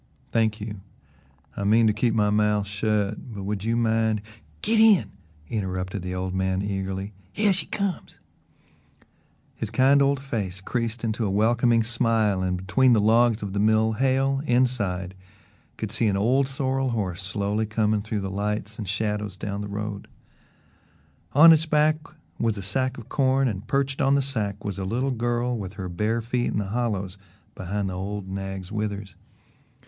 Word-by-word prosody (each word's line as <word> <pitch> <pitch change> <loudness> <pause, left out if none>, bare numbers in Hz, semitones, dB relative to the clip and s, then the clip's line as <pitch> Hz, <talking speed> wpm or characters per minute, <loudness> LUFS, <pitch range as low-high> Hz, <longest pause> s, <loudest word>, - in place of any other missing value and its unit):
"Thank 110 -1 +1
you, 105 -2 -6 0.7
I 100 - -3
mean 110 +3 +4
to 110 - +4
keep 115 +2 +1
my 105 -1 +2
mouth 105 -1 +2
shut, 105 +2 -2
but 100 - -5
would 100 0 -3
you 115 +1 0
mind 110 -2 +1 0.2
" - - -30
"Git 220 +1 +3
in!" 220 -4 +5 0.4
interrupted 95 -2 -3
the 90 +1 -4
old 90 0 -3
man 95 0 0
eagerly. 95 0 -3 0.2
"Hyeh 210 -1 +4
she 185 - -1
comes." 200 -4 -3 1.4
His 110 - -4
kind 135 +5 +4
old 140 0 +3
face 105 -9 -4
creased 115 +3 -3
into 115 0 -1
a 105 - 0
welcoming 115 +3 +3
smile, 110 -4 +1
and 90 -1 0
between 120 +8 +3
the 110 - +4
logs 115 +1 +3
of 100 -2 -4
the 100 - -1
mill 110 +1 +3
Hale, 135 +3 +1
inside, 105 -8 +1 0.6
could 110 -2 -4
see 115 0 +1
an 100 -2 +1
old 130 +7 +2
sorrel 135 -1 -1
horse 100 -6 -2
slowly 100 +3 -1
coming 110 -1 +1
through 105 0 -3
the 95 0 -4
lights 105 +2 -3
and 105 -5 -4
shadows 105 -1 -2
down 100 +1 -4
the 105 - -4
road. 100 0 -5 1.3
On 165 +4 +9
its 160 +1 +1
back 155 0 +3 0.4
was 115 -2 0
a 100 - -5
sack 130 +6 -1
of 115 - -10
corn 135 -1 +2
and 105 -1 -4
perched 140 +1 0
on 135 0 +4
the 140 - +2
sack 105 -6 -2
was 100 -1 -3
a - - -3
little 125 +8 -1
girl 120 0 -1
with 100 -4 -5
her 95 -2 -5
bare 105 +6 -1
feet 120 +1 -1
in - - -1
the 100 -2 -2
hollows 100 -5 -2 0.3
behind 100 +2 -3
the - - -5
old 100 +1 -4
nag's 95 -1 -5
withers. 105 -2 -4
110 Hz, 175 wpm, -25 LUFS, 100-120 Hz, 1.4 s, On